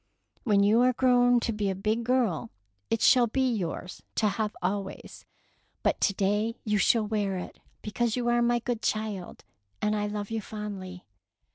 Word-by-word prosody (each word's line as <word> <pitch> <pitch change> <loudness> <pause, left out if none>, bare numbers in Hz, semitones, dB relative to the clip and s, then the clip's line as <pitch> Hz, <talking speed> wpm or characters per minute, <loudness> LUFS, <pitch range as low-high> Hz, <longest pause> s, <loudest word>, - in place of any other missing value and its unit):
When 205 -4 +4
you 215 +4 +4
are 250 0 +4
grown 245 -1 +4
to 230 - -1
be 210 -2 -1
a 190 - -1
big 215 +4 -1
girl, 240 - 0 0.4
it 225 - 0
shall 245 -2 +6
be 260 +3 +1
yours 180 -4 -4
to 215 - +2
have 210 +1 -2
always, 195 +2 -4 0.6
but - - +1
to 200 - +3
day 210 +4 0
you 210 -1 +1
shall 220 +1 +3
wear 205 -3 -1
it 180 - -8 0.2
because 225 +1 -1
you 245 -1 -2
are 240 0 +3
my 240 0 +3
good 235 -1 -3
child, 215 -4 -3 0.4
and 210 0 0
I 210 0 -1
love 205 0 -5
you 225 -1 -2
fondly." 195 -4 -7
215 Hz, 175 wpm, -28 LUFS, 200-235 Hz, 0.6 s, shall